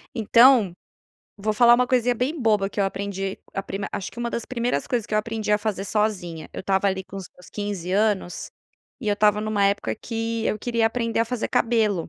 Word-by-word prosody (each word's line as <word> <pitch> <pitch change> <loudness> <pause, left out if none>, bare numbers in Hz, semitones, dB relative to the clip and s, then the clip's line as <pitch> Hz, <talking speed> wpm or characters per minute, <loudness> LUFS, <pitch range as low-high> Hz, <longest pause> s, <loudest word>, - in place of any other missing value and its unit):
Então, 230 -3 +5 0.6
vou 215 +1 -1
falar 240 +2 +6
uma 250 +1 +2
coisinha 245 -1 +2
bem 275 +7 -2
boba 210 -4 +2
que 205 - -4
eu - - +3
aprendi 195 0 -3 0.2
a 195 - -2
prim 195 - -5
acho 195 - -4
que - - -13
uma 240 0 -1
das 235 - -3
primeiras 245 -1 -1
coisas 240 -4 -1
que - - -4
eu - - +4
aprendi 220 -1 -2
a 210 - +4
fazer 205 -2 -2
sozinha, 190 -7 -2
eu - - -5
estava 195 +1 +2
ali 190 0 -2
com 190 +1 -10
os 190 -2 -7
meus 180 - -17
15 200 -4 -4
anos, 205 -3 0 0.5
e 240 - -6
eu - - +3
estava 210 0 +3
em 215 - -4
uma 205 -2 +1
época 200 +1 +1
que 225 0 -3
eu 215 - 0
queria 230 0 +1
aprender 230 0 -1
a 230 - +3
fazer 240 0 -2
cabelo. 220 -7 +1
215 Hz, 225 wpm, -24 LUFS, 195-230 Hz, 0.6 s, falar